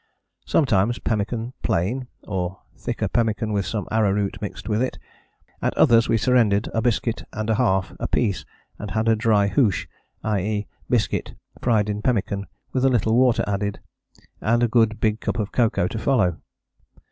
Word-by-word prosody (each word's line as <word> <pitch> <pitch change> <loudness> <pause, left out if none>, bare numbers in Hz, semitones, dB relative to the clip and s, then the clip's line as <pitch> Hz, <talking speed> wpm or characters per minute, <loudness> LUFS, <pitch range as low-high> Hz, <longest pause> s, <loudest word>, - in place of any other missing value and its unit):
Sometimes 120 -5 +2
pemmican 115 +3 -2
plain, 120 +10 0 0.2
or 95 -2 -3
thicker - - -3
pemmican 110 -2 0
with 100 -2 0
some 105 -3 -3
arrowroot 100 -2 +1
mixed 105 - -6
with 110 0 +1
it: 130 - -1 0.6
at - - -1
others 115 -1 +5
we 115 - +4
surrendered 110 -3 +3
a 115 - +1
biscuit 115 0 0
and 110 +1 -2
a - - +4
half 95 -6 +1
apiece 100 -8 0 0.4
and 105 - -5
had 110 +3 -1
a 115 - +5
dry 110 -2 +3
hoosh, 105 -1 +2 0.4
i.e. 105 0 -1 0.2
biscuit 115 -5 0 0.3
fried 110 -4 +2
in 105 0 -2
pemmican 100 -4 -1 0.3
with 130 - +1
a 135 - +5
little 115 -3 +2
water 125 -1 +4
added, 100 0 -2 0.6
and 120 +2 +2
a - - +4
good 115 -2 +2
big 110 0 +1
cup - - -2
of 105 -3 -2
cocoa 115 -7 +2
to 110 - -4
follow. 105 - +1
110 Hz, 160 wpm, -23 LUFS, 100-120 Hz, 0.6 s, others